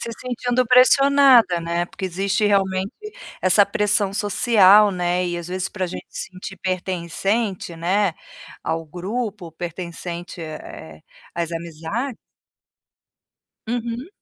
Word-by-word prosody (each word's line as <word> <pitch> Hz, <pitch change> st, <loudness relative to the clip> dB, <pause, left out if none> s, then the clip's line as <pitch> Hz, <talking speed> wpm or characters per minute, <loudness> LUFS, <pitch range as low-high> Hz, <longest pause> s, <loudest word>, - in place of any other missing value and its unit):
Se 235 Hz, -, -5 dB
sentindo 245 Hz, 0 st, 0 dB
pressionada 255 Hz, -5 st, +6 dB
né. 170 Hz, +1 st, -1 dB
Porque 190 Hz, -, -8 dB
existe 195 Hz, +3 st, 0 dB
realmente 190 Hz, -1 st, +1 dB, 0.5 s
essa 190 Hz, +2 st, +5 dB
pressão 205 Hz, -1 st, +1 dB
social, 205 Hz, -1 st, +5 dB
né, 180 Hz, -1 st, 0 dB
e 175 Hz, 0 st, -2 dB
às 170 Hz, 0 st, -7 dB
vezes 185 Hz, 0 st, -3 dB
pra 190 Hz, -3 st, -3 dB
gente 175 Hz, -, -8 dB
se -, -, -6 dB
sentir 185 Hz, +1 st, -8 dB
pertencente, 185 Hz, +2 st, -2 dB
né, 185 Hz, +3 st, +1 dB, 0.5 s
ao 165 Hz, 0 st, -2 dB
grupo 200 Hz, +4 st, -4 dB
ou 165 Hz, -, -12 dB
pertencente, 175 Hz, +1 st, -6 dB
eh 155 Hz, -, -9 dB
eh -, -, -28 dB, 0.3 s
às 170 Hz, -1 st, -2 dB
amizades 170 Hz, -, -4 dB, 1.5 s
Uhum. 240 Hz, +4 st, -3 dB
190 Hz, 120 wpm, -22 LUFS, 175-215 Hz, 1.5 s, pressionada